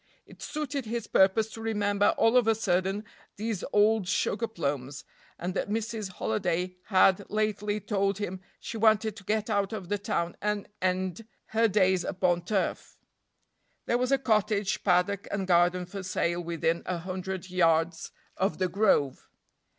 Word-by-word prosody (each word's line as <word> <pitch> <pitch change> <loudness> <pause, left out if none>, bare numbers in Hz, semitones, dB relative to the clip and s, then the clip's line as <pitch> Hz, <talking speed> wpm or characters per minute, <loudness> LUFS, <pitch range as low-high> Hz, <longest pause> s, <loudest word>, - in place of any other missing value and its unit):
It - - -16
suited 290 -3 -3
his 230 0 -3
purpose 205 +4 +3
to 225 - -8
remember 205 -2 +1
all 225 +2 +4
of 245 -3 +4
a 225 - +4
sudden 195 0 0 0.3
these 215 -2 -3
old 210 -1 +3
sugar 225 +3 0
plums, 140 - -3 0.3
and 180 +2 -3
that 200 - -2
Mrs. 215 -2 -3
Holiday 180 -4 -1
had 190 -1 +3
lately 210 0 -1
told 195 -1 0
him 190 -3 -4 0.2
she 230 - -6
wanted 220 -1 +3
to 200 - -12
get 215 +2 -1
out 200 +1 0
of 190 -5 -6
the 205 - 0
town 175 -4 -2
and 210 -1 -1
end 185 +3 -1 0.2
her 225 +1 +3
days 190 -3 +2
upon 175 -2 0
turf. 195 0 -2 0.9
There 240 - +1
was 250 +1 0
a 275 - +5
cottage, 215 -4 +1
paddock 185 +2 +2
and 200 -1 -2
garden 180 0 +3
for 195 +2 -7
sale 175 -2 -1
within 170 0 -1
a 180 - -1
hundred 185 +1 -5
yards 165 -2 +2 0.3
of 195 +2 0
"The 185 -1 0
Grove." 180 -9 +1
195 Hz, 160 wpm, -28 LUFS, 180-215 Hz, 0.9 s, a